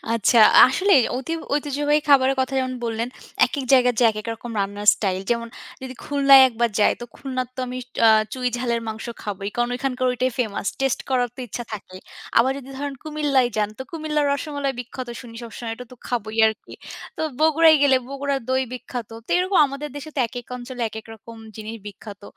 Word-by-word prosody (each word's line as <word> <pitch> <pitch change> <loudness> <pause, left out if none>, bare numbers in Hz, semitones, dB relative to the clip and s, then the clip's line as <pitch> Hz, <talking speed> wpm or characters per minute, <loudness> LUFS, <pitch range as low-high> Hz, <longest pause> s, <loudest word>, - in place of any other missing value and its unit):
আচ্ছা! 230 +2 +3 0.3
আসলেই 290 +1 +4
অতি 265 +5 -4 0.2
ঐতিহ্যবাহী 295 +1 +1
খাবারের 270 -1 +5
কথা 260 +1 -1
যেমন 255 -1 -2
বললেন, 230 +1 -2 0.4
একেক 280 -3 -4
জায়গায় 250 -1 +5
যে 240 - +5
একেক 215 +1 -7
রকম 235 +1 -9
রান্নার 205 +1 -4
স্টাইল 190 -3 -2
যেমন 235 0 -1 0.3
যদি 260 -1 -7
খুলনায় 275 -2 +6
একবার 235 0 0
যাই 210 - +4
তো 240 - -5
খুলনার 255 -2 -4
তো - - -3
আমি 250 +1 -5 0.3
আ - - +8 0.2
চুই 255 -1 -3
ঝালের 235 -1 -1
মাংস 220 0 -6 0.2
খাবোই। 200 -1 -4
কারণ 240 0 +1
ঐখানকার 255 0 -2
ঐটাই 255 +1 0
ফেমাস। 215 -4 -2
টেস্ট 270 -2 0
করার 250 -2 +2
তো - - -8
ইচ্ছা 240 +2 -6
থাকে। 190 -3 -8 0.4
আবার 245 +3 +4
যদি 270 -1 -11
ধরেন 285 0 -4
কুমিল্লায় 290 -5 +1
যান, 210 -1 +1
তো - - -4
কুমিল্লার 305 -2 -1
রসমালাই 285 -1 -2
বিখ্যাত 250 +1 -7
শুনি 235 -2 -12
সবসময় 230 0 -6
এটাতো 250 +1 -11
খাবোই 220 -2 -3
আরকি। 220 0 -4 0.4
তো - - -3 0.2
বগুড়ায় 320 0 +6
গেলে, 275 -2 +5
বগুড়ার 275 0 -2
দই 260 0 +2
বিখ্যাত। 250 -2 -6 0.2
তো - - -13
এরকম 370 +1 +2
আমাদের 275 +2 -6
দেশে 290 +2 -7
তো - - -1
একেক 245 0 -8
অঞ্চলে 245 0 -7
একেক 220 +1 -9
রকম 225 +1 -13 0.2
জিনিস 220 +1 -7
বিখ্যাত। 205 0 -10
255 Hz, 185 wpm, -22 LUFS, 230-275 Hz, 0.4 s, আ